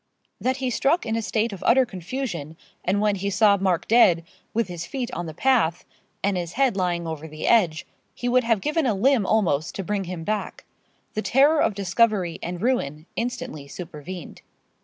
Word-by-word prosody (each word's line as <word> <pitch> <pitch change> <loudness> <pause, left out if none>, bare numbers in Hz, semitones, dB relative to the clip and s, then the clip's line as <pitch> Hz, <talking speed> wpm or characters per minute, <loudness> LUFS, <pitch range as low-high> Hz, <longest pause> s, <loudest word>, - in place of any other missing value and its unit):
That 260 +1 0
he 260 -2 -2
struck 280 +7 +1
in 225 -1 -1
a 230 - 0
state 215 +2 -1
of 190 - -8
utter 260 +2 +5
confusion, 180 - -5 0.3
and 195 +3 +1
when 210 -1 +2
he 200 +2 -2
saw 200 +1 +4
Mark 185 -3 0
dead, 185 -8 +5 0.3
with 230 +1 0
his 175 -2 -6
feet 255 -3 -4
on 175 0 -4
the 160 - -6
path, 230 -10 +2 0.4
and 200 0 +1
his 175 -1 -3
head 265 -4 +2
lying 175 -3 -1
over 160 -1 -5
the 155 0 -5
edge, 175 -9 +3 0.3
he 245 - -4
would 250 +1 +3
have 230 -3 +1
given 300 -1 0
a 220 - +1
limb 230 0 +3
almost 170 -8 +1
to 195 - -3
bring 200 0 -2
him 175 -2 -5
back. 215 +3 -3 0.5
The 215 - -1
terror 285 +7 +4
of 210 - +1
discovery 195 -2 +1
and 175 +2 -5
ruin 155 - 0
instantly 155 - -4
supervened. 170 +2 -8
200 Hz, 190 wpm, -24 LUFS, 175-240 Hz, 0.5 s, utter